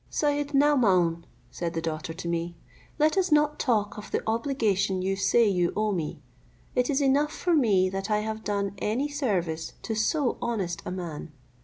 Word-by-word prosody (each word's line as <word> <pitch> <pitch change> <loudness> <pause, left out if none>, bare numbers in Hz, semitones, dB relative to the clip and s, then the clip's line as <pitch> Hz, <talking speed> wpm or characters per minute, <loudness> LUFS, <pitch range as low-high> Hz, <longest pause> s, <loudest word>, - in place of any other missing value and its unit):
"Syed 290 -1 0
Naomaun," 190 - +3 0.3
said 170 -1 -4
the - - 0
daughter 160 0 -4
to 170 +1 -6
me, 170 0 -2 0.4
"let 310 +5 +3
us 370 -3 0
not 300 0 +3
talk 215 -5 0
of 210 - -10
the - - -1
obligation 215 -6 0
you 195 +1 0
say 225 +4 +3
you 180 -3 +1
owe 215 0 +1
me; 160 -4 -4 0.5
it 250 0 +1
is 285 0 +1
enough 285 +2 +3
for 350 +2 -1
me 210 - +4
that 195 +2 -4
I 210 0 +2
have 220 0 -4
done 200 -1 -1
any 240 +7 0
service 190 - -2
to 225 - -2
so 245 +5 0
honest 190 -8 -2
a - - -3
man. 170 -4 -6
210 Hz, 180 wpm, -27 LUFS, 180-275 Hz, 0.5 s, me